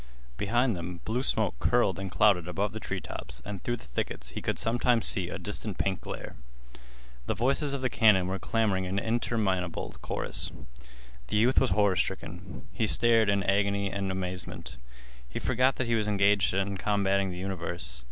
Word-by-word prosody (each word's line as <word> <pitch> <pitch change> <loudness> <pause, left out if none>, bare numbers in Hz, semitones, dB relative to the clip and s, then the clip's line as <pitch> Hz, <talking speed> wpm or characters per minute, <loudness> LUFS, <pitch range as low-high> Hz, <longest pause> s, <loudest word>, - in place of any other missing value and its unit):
Behind 120 - +1
them 85 0 -6
blue 115 +4 0
smoke - - 0
curled - - +2
and 95 0 -4
clouded 95 -3 +3
above 100 +3 -1
the 110 - -5
treetops, 70 - -5
and 100 -3 -6
through 120 - -1
the - - -13
thickets - - -4
he - - -6
could - - -1
sometimes 120 0 +2
see 90 -3 +3
a - - -4
distant 105 -1 -4
pink 95 -2 -1
glare. - - -7 0.9
The - - 0
voices 135 +4 +1
of 135 - -5
the - - +3
cannon 105 -5 +5
were 95 +1 -2
clamoring 105 -5 0
in 95 +2 -2
interminable 100 -6 -1
chorus. - - -2 0.8
The 105 - 0
youth 120 +5 +4
was 130 - +2
horrorstricken. 95 -2 -1
He 110 - 0
stared 115 -1 +3
in 100 -1 +2
agony 100 0 +1
and 100 -1 -2
amazement. 95 -1 -3 0.5
He - - -6
forgot 130 +1 +2
that 130 - -1
he 115 - 0
was 110 -2 +1
engaged 100 -1 +3
in 100 0 0
combating 100 -1 +1
the 90 - -6
universe. 85 -8 -4
100 Hz, 170 wpm, -29 LUFS, 95-110 Hz, 0.9 s, cannon